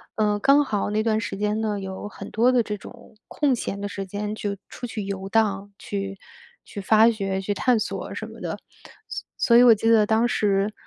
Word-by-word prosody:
呃， 210 Hz, -1 st, +1 dB
刚 280 Hz, +4 st, +4 dB
好 205 Hz, -5 st, -1 dB
那 215 Hz, +1 st, 0 dB
段 220 Hz, -1 st, +1 dB
时 205 Hz, -2 st, -4 dB
间 210 Hz, +1 st, 0 dB
呢， 210 Hz, -2 st, -1 dB
有 190 Hz, +1 st, -6 dB
很 -, -, -9 dB
多 240 Hz, +3 st, +3 dB
的 250 Hz, -1 st, +4 dB
这 210 Hz, -2 st, -4 dB
种 230 Hz, +2 st, -14 dB
空 285 Hz, -4 st, +1 dB
闲 200 Hz, -4 st, -4 dB
的 205 Hz, -, -3 dB
时 195 Hz, -1 st, -5 dB
间 205 Hz, +2 st, -4 dB
就 205 Hz, -2 st, -3 dB
出 245 Hz, -, -8 dB
去 225 Hz, -2 st, -5 dB
游 195 Hz, -1 st, -5 dB
荡， 205 Hz, -2 st, +1 dB
去 195 Hz, -1 st, -5 dB, 0.5 s
去 200 Hz, -, -7 dB
发 220 Hz, +3 st, +5 dB
掘、 195 Hz, -4 st, -2 dB
去 200 Hz, +2 st, -2 dB
探 245 Hz, +3 st, +2 dB
索 215 Hz, -, -4 dB
什 -, -, -5 dB
么 -, -, -12 dB
的。 -, -, -4 dB, 0.5 s
所 -, -, -6 dB
所 235 Hz, -, +4 dB
以 245 Hz, -, +8 dB
我 240 Hz, -2 st, +8 dB
记 225 Hz, +1 st, 0 dB
得 220 Hz, -2 st, +5 dB
当 220 Hz, +2 st, +2 dB
时 205 Hz, -3 st, +1 dB
210 Hz, 230 characters per minute, -24 LUFS, 200-225 Hz, 0.5 s, 以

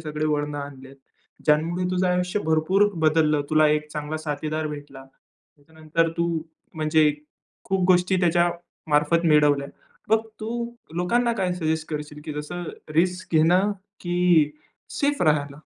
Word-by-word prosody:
सगळे 150 Hz, 0 st, -4 dB
वळणं 145 Hz, -1 st, -1 dB
आणलेत. 135 Hz, -1 st, -9 dB, 0.5 s
ज्यांमुळे 165 Hz, +4 st, +2 dB
तुझं 185 Hz, 0 st, +1 dB
आयुष्य 180 Hz, +3 st, 0 dB
भरपूर 160 Hz, +6 st, +3 dB, 0.2 s
बदललं, 155 Hz, -1 st, +3 dB
तुला 155 Hz, 0 st, +5 dB
एक 150 Hz, 0 st, 0 dB
चांगला 150 Hz, +1 st, -4 dB
साथीदार 155 Hz, +1 st, -2 dB
भेटला. 145 Hz, -2 st, -9 dB
त्याच्यानंतर 155 Hz, +4 st, -5 dB
तू 170 Hz, 0 st, +1 dB, 0.5 s
म्हणजे 155 Hz, -1 st, +3 dB, 0.5 s
खूप 190 Hz, -1 st, 0 dB
गोष्टी 180 Hz, +1 st, +4 dB
त्याच्यामार्फत 170 Hz, -2 st, +1 dB
मिळवल्या. 145 Hz, -2 st, +3 dB, 0.4 s
मग 220 Hz, +1 st, +2 dB
तू 215 Hz, -, -4 dB, 0.5 s
लोकांना 235 Hz, +8 st, +1 dB
काय 190 Hz, -5 st, -1 dB
सजेस्ट 160 Hz, -2 st, -2 dB
करशील, 150 Hz, -1 st, -5 dB
की 155 Hz, -, -5 dB
जसं 150 Hz, +4 st, -5 dB, 0.3 s
रिस्क 180 Hz, +2 st, 0 dB
घेणं 180 Hz, +6 st, +4 dB, 0.3 s
की 175 Hz, -4 st, +3 dB, 0.5 s
सेफ 285 Hz, -4 st, +1 dB
राहायला? 145 Hz, -3 st, +1 dB
155 Hz, 125 wpm, -24 LUFS, 150-180 Hz, 0.5 s, तुला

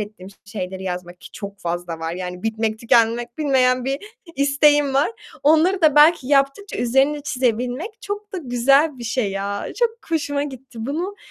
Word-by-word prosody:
ettiğim 205 Hz, -3 st, -8 dB, 0.2 s
şeyleri 190 Hz, -2 st, -6 dB
yazmak 180 Hz, -1 st, -5 dB
ki -, -, -12 dB
çok 200 Hz, -1 st, -8 dB
fazla 170 Hz, -1 st, -4 dB
var 165 Hz, +1 st, -3 dB
yani 180 Hz, 0 st, -6 dB
bitmek 220 Hz, 0 st, -1 dB
tükenmek 235 Hz, +1 st, +2 dB
bilmeyen 255 Hz, -4 st, +2 dB
bir 270 Hz, +1 st, -1 dB, 0.4 s
isteğim 285 Hz, 0 st, +3 dB
var. 275 Hz, +10 st, +3 dB, 0.3 s
Onları 325 Hz, +5 st, +4 dB
da 305 Hz, -3 st, +5 dB
belki 295 Hz, -3 st, +6 dB
yaptıkça 280 Hz, +8 st, +1 dB
üzerine 270 Hz, +5 st, +2 dB
çizebilmek 255 Hz, -, -2 dB
çok 415 Hz, 0 st, -6 dB
da 375 Hz, -, -3 dB
güzel 275 Hz, +1 st, +2 dB
bir 240 Hz, -, -7 dB
şey 230 Hz, -3 st, -1 dB
ya, 200 Hz, +1 st, -3 dB
çok 475 Hz, -2 st, +2 dB, 0.2 s
hoşuma 285 Hz, -3 st, 0 dB
gitti. 265 Hz, -4 st, -9 dB
Bunu 350 Hz, +8 st, -3 dB
255 Hz, 160 wpm, -21 LUFS, 215-295 Hz, 0.4 s, belki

